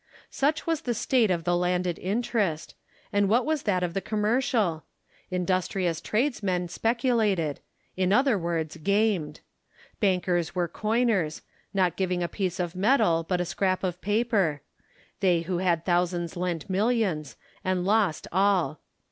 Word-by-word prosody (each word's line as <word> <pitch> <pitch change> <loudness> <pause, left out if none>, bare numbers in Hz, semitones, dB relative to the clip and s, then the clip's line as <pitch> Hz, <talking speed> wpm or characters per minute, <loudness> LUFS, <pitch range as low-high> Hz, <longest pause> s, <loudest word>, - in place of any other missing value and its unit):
Such 295 +3 0
was 325 -2 0
the 240 -4 -2
state 235 -1 +2
of 170 -2 0
the 175 +1 +1
landed 180 0 0
interest; 200 -5 -1 0.4
and 200 -1 +3
what 240 +4 +3
was 310 -1 0
that 185 -4 0
of 175 -1 -2
the 195 - -1
commercial? 215 - 0 0.5
Industrious 180 -1 -1
tradesmen 205 -8 -1
speculated; 225 - +1 0.4
in 185 0 +1
other 255 +2 +4
words, 165 -4 -2
gamed. 200 -4 0 0.6
Bankers 180 -4 +1
were 175 -1 +1
coiners; 215 -4 0 0.3
not 185 -3 +1
giving 180 -2 0
a - - 0
piece 185 -1 -3
of 175 0 -2
metal, 195 -4 +3
but 180 -1 +1
a - - -1
scrap 185 +2 -1
of 180 -1 -2
paper. 205 - +1 0.6
They 180 -4 +3
who 175 +1 -2
had 170 -3 +1
thousands 175 -1 0
lent 175 -3 -3
millions, 195 - 0 0.3
and 185 -1 0
lost 200 -5 +1
all. 190 -4 +2
185 Hz, 140 wpm, -27 LUFS, 175-215 Hz, 0.6 s, other